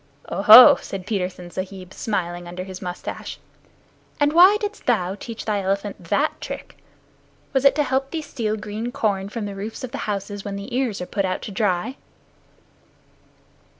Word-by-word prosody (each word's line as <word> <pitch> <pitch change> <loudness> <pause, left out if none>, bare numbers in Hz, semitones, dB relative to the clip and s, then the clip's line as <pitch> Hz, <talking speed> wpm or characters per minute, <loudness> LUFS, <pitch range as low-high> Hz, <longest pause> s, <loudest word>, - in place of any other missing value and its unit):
"Oho!" 215 +7 +9
said 190 -2 -7
Petersen 180 -4 -3
Sahib, 185 0 -7
smiling 175 -5 -3
underneath 180 +2 -7
his 185 -1 -8
mustache, 180 -1 -6 0.8
"and 290 0 +2
why 370 +5 +7
didst 420 0 -5
thou 190 -7 +1
teach 225 +3 -8
thy 210 -2 0
elephant 195 -1 -3
that 290 - 0
trick? - - -7 0.8
Was 265 0 +1
it 275 - +6
to 295 - +2
help 270 0 -1
thee 320 0 -4
steal 220 -6 -3
green 210 +3 -5
corn 200 -4 -1
from 215 0 -4
the 200 - -5
roofs 210 +5 -7
of 255 - -5
the 280 - -5
houses 200 0 -4
when 200 -1 -5
the 200 +5 -6
ears 250 -7 -1
are - - -3
put 200 +2 -2
out 185 -1 -2
to - - -6
dry?" 200 +4 -1
205 Hz, 170 wpm, -22 LUFS, 190-245 Hz, 0.8 s, Oho